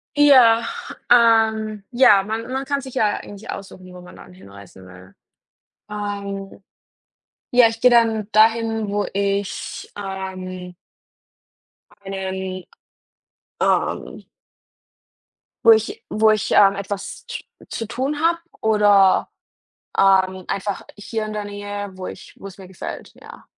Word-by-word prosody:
Ja, 255 -6 +6 0.5
ähm 220 -3 +3
ja, 240 -5 +6
man 220 +3 -4
man 270 +1 -2
kann 280 0 -1
sich 260 -1 -10
ja 215 -5 +1
eigentlich 205 +2 -11
aussuchen, 185 -2 -9
wo 180 - -11
man 180 - -14
dann 180 - -14
hinreisen 100 - -15
will. 90 +1 -15 0.7
Ähm, 200 -1 -6 0.9
ja, 245 -1 +6
ich 225 0 -7
gehe 250 - +6
dann 225 -3 +3
dahin, 225 0 +2
wo 205 0 -1
ich, 200 0 -3
ähm 185 -2 -6 1.3
einen, 190 -1 -5 1.0
ähm - - -1 1.4
wo 230 - +9
ich 225 - +1
wo 220 +1 +3
ich, 215 - -1
ähm, 195 -1 +5
etwas 200 - -6
tu 480 -1 -5 0.3
zu 225 - -5
tun 270 +5 -3
habe, 335 +1 +3 0.2
oder, 205 -3 +4 0.7
ähm, 190 -1 +3
einfach 200 0 -3
hier 215 +1 -4
in 215 - -6
der 210 -1 -4
Nähe, 205 0 -6
wo 185 0 -7
ich - - -10
wo - - -10
es 195 -1 -11
mir 190 -2 -12
gefällt, 190 - -8
ja. - - -14
205 Hz, 125 wpm, -21 LUFS, 190-225 Hz, 1.4 s, wo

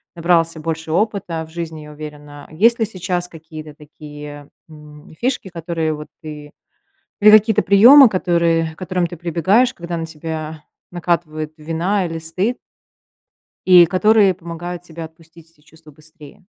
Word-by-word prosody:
набрался 165 -1 +1
больше 160 0 -4
опыта 180 -3 -1
в - - -19
жизни, 165 -2 -6
я 150 0 -11
уверена. 150 -1 -11
Есть 230 +9 +3
ли 225 - +2
сейчас 185 -3 -4
какие-то 155 -2 -11
такие, 150 -1 -11 0.2
м, 150 -1 -15
фишки, 245 -5 -2
которые 165 -2 -3
вот 150 0 -8 0.2
ты 150 -1 -9 0.7
или 210 +1 +8
какие-то 215 0 +5
приемы, 240 +8 +8
которые 170 -4 0
к - - -39
которым 180 -1 -2
ты 175 - -9
прибегаешь, 180 +9 +1
когда 170 0 -6
на 165 - -4
тебя 160 -1 -7 0.3
накатывает 165 -3 -2
вина 170 +5 -1
или 165 -1 -5
стыд 185 +9 -2 1.1
и 180 -2 +9
которые 200 +3 +3
помогают 175 0 -8
тебе 165 -1 -9
отпустить 165 0 -15
эти 165 - -32
чувства 155 +1 -18
быстрее? 155 +2 -15
165 Hz, 145 wpm, -19 LUFS, 155-180 Hz, 1.1 s, и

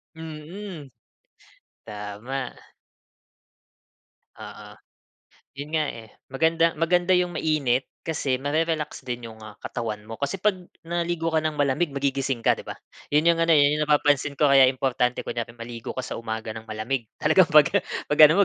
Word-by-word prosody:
Mhm, 160 0 -8 0.9
tama. 105 +5 -5 1.8
Oo. - - -10 0.9
'Yun 145 +2 -7
nga 155 -2 +1
eh, 110 -2 -9 0.2
maganda 165 +4 +2
maganda 175 +3 +3
yung 180 -1 +1
mainit, 135 -5 0 0.2
kasi 140 -5 -1
mare-relax 155 +1 -1
din 120 -1 -4
yung 110 -1 -12
ah, 110 -1 -11
katawan 110 -3 -5
mo. 115 - -7
Kasi 140 +7 -1
'pag 210 +2 +3 0.3
naligo 170 -1 -1
ka 160 - +3
ng 155 -1 -2
malamig, 145 +4 +2
magigising 135 -2 -1
ka, - - +5
di - - -9
ba? - - -8 0.3
'Yun 150 +2 +2
yung 165 - -2
ano 165 0 +2
eh, - - +6
'yun 150 +1 +2
'yung - - +2
napapansin 145 -1 +2
ko, 145 -2 +4
kaya 135 -1 +8
importante 125 -1 0
kunyari 115 0 -5
maligo 115 0 -7
ka 130 - -3
sa - - -5
umaga 110 -1 -4
ng 110 0 -10
malamig. 110 +2 -3
Talagang 160 +2 +4
pag 150 -1 +7 0.4
pag 150 - -1
ano 195 +6 +4
140 Hz, 155 wpm, -25 LUFS, 120-160 Hz, 1.8 s, kaya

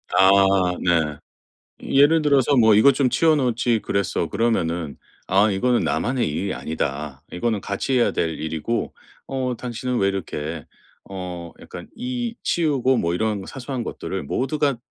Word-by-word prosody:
아. 95 0 +6 0.5
네. 80 -5 +1 0.6
예를 145 +4 +4
들어서 140 -2 +3
뭐 110 -3 +6
"이것 130 +6 +6
좀 130 -1 +2
치워 160 +4 +3
놓지 120 -4 +1
그랬어." 100 -3 -1
그러면은 85 -7 -1 0.3
"아. 100 +3 +3
이거는 120 +5 +1
나만의 125 0 0
일이 95 +6 -2
아니다. 75 -2 -4
이거는 110 +2 -1
같이 100 +7 -3
해야 120 - +3
될 80 -1 -2
일이고 80 +9 -3 0.3
어 130 -2 -2
당신은 125 +1 -3
왜 100 - +2
이렇게 80 -5 -4 0.4
어 90 -3 -6
약간 85 - -10
이 245 -1 -4
치우고 135 -6 +1
뭐 85 0 0
이런 105 0 -1
사소한 130 -1 -5
것들을 95 -5 -5
모두가" 140 - -1
110 Hz, 290 characters per minute, -22 LUFS, 90-130 Hz, 0.6 s, 아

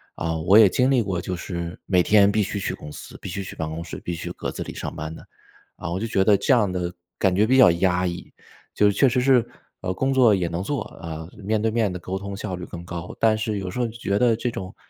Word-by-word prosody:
啊， 80 0 -2
我 95 +6 +5
也 110 -3 +8
经 125 +7 +2
历 130 -3 +4
过， 95 -5 -2
就 90 0 -4
是 85 -1 -5
每 90 -2 +3
天 100 +1 +5
必 105 0 +2
须 100 0 -2
去 - - -2
公 75 - -9
司， - - -10
必 - - -7
须 100 +2 -4
去 - - -9
办 80 -1 -3
公 80 +1 -5
室， 85 - -7
必 85 - -4
须 85 - -5
格 - - -5
子 - - -5
里 - - -8
上 - - -6
班 80 +1 -5
的， - - -13 0.5
啊， 85 - -6
我 90 - -2
就 115 - -2
觉 95 -3 +2
得 100 0 +5
这 135 - +2
样 105 -7 +3
的 90 -1 -3 0.3
感 95 -1 +2
觉 105 +2 +4
比 130 +3 +3
较 130 - +8
压 90 +1 +1
抑。 85 0 -6 0.4
就 105 - +3
是 100 - -1
确 135 - +5
实 125 +1 +1
是， 125 -3 +4 0.3
呃， 90 - -2
工 135 +8 0
作 125 -5 +5
也 90 -2 -1
能 85 +2 -3
做， 140 +6 -2
啊， 80 -2 -8 0.2
面 110 +2 +1
对 110 - +2
面 110 -4 +1
地 90 - -4
沟 95 +2 -4
通 100 0 -6
效 95 -3 -4
率 90 - -8
更 85 -1 -8
高， 85 0 -6
但 110 -1 +4
是 110 -1 -2
有 95 -1 -4
时 - - -5
候 120 - +1
觉 110 -3 -2
得 120 -2 +4
这 120 +2 -2
种 95 -4 -7
95 Hz, 300 characters per minute, -23 LUFS, 90-110 Hz, 0.5 s, 也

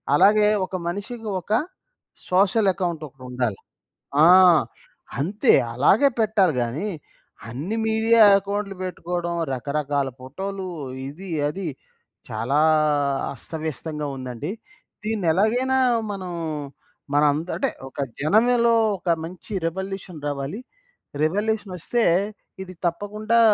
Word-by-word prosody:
అలాగే 210 +4 +5 0.2
ఒక 185 - -7
మనిషికి 215 +5 -5
ఒక 190 - -12 0.8
సోషల్ 195 +3 +3
అకౌంట్ 175 -4 -3
ఒకటుండాలి. 125 -5 -4 0.7
ఆ! - - +8 0.9
అంతే. 195 +9 +3 0.2
అలాగే 195 - +4
పెట్టాలి 210 -7 +3
గాని 125 - -2 0.6
అన్ని 155 - -4
మీడియా 225 +1 +4 0.2
అకౌంట్‌లు 200 0 -4
పెట్టుకోవడం, 175 -1 -3 0.2
రకరకాల 140 +1 -1
ఫోటో‌లు 190 +8 -5 0.4
ఇది 185 +6 -10 0.2
అది 185 +2 -5 0.6
చాలా 120 +7 0 0.7
అస్తవ్యస్తంగా 155 -1 -5
ఉందండి. 130 +6 -5 0.5
దీన్నెలగయినా 220 +6 +1 0.4
మనం 185 -2 -6 0.8
మనంద 150 +2 +3
అంటే 270 - +1 0.2
ఒక 135 - -12 0.2
జనంలో 235 - +4 0.3
ఒక 175 - -5
మంచి 175 +5 -9
రివల్యూషన్ 190 -2 -5
రావాలి. 145 - -3 0.6
రివల్యూషనొస్తే 205 +4 -1 0.6
ఇది 185 -1 -10
తప్పకుండా 210 +6 0
185 Hz, 90 wpm, -23 LUFS, 150-210 Hz, 0.9 s, ఆ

